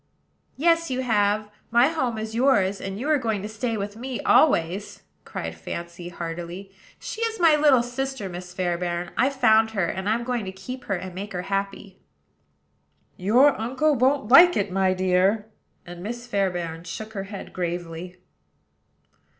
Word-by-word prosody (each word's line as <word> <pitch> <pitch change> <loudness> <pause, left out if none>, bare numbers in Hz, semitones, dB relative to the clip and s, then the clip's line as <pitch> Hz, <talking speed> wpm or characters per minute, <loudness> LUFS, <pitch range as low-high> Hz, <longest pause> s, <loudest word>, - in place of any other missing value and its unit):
"Yes, 330 +2 +2
you 260 0 -1
have: 210 -3 +1 0.2
my 240 +4 +5
home 260 -8 -1
is 220 0 -5
yours; 205 -6 +2
and 195 +1 -5
you 270 - -3
are 305 -2 +3
going 220 -5 -2
to - - -3
stay 225 +1 -3
with 205 0 -4
me 250 +2 -5
always," 190 - +2 0.2
cried 80 0 -5
Fancy, 170 - -7
heartily. 175 +3 -6 0.3
"She 450 - -6
is 455 -2 -1
my 330 -3 +6
little 290 -5 +4
sister, 255 -2 -4
Miss 180 0 -8
Fairbairn: 175 -1 -2
I 260 - +3
found 225 -5 +4
her; 190 - +2
and 190 +4 -3
I'm 230 +2 +1
going 245 -2 -2
to 190 - -5
keep 250 +7 -8
her, 195 - -1
and 185 0 -6
make 200 +3 -6
her 180 0 -3
happy." 195 0 -4 1.1
"Your 245 +10 +4
uncle 265 +7 +1
won't 260 -1 +2
like 350 +7 +8
it, 200 -1 -1
my 190 0 +2
dear." 185 +3 +2 0.4
And 175 0 -9
Miss 240 +5 -6
Fairbairn 175 -6 -2
shook 215 +6 -7
her 195 -2 -4
head 200 0 -9
gravely. 175 0 -5
205 Hz, 165 wpm, -24 LUFS, 180-250 Hz, 1.1 s, like